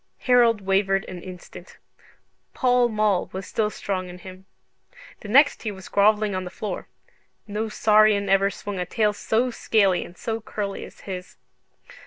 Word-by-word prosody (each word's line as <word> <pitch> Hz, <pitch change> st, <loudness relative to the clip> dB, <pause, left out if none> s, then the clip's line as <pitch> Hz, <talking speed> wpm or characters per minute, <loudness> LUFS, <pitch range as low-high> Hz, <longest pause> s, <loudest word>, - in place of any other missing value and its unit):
Harold 240 Hz, -4 st, +4 dB
wavered 195 Hz, 0 st, +1 dB
an 180 Hz, -1 st, -8 dB
instant: 180 Hz, -1 st, -11 dB, 0.8 s
Pall 250 Hz, -2 st, +3 dB
Mall 215 Hz, -4 st, +1 dB
was 190 Hz, +1 st, -5 dB
still 215 Hz, -1 st, -1 dB
strong 185 Hz, -3 st, -4 dB
in 180 Hz, -, -9 dB
him. 185 Hz, +1 st, -12 dB, 0.7 s
The -, -, -10 dB
next 280 Hz, +7 st, +4 dB
he 220 Hz, -, -3 dB
was 190 Hz, -2 st, -11 dB
grovelling 210 Hz, 0 st, +3 dB
on 185 Hz, 0 st, -2 dB
the 180 Hz, -, -6 dB
floor. 190 Hz, 0 st, -6 dB, 0.6 s
No 215 Hz, +1 st, -3 dB
saurian 210 Hz, -1 st, +4 dB
ever 195 Hz, 0 st, +3 dB
swung 200 Hz, 0 st, -6 dB
a 180 Hz, -, -1 dB
tail 210 Hz, +2 st, +1 dB
so 235 Hz, +4 st, 0 dB
scaly 200 Hz, -6 st, +2 dB
and 175 Hz, -, -13 dB
so 225 Hz, -1 st, -3 dB
curly 205 Hz, -2 st, -5 dB
as -, -, -15 dB
his. 185 Hz, -1 st, -8 dB
205 Hz, 160 wpm, -24 LUFS, 190-220 Hz, 0.8 s, Harold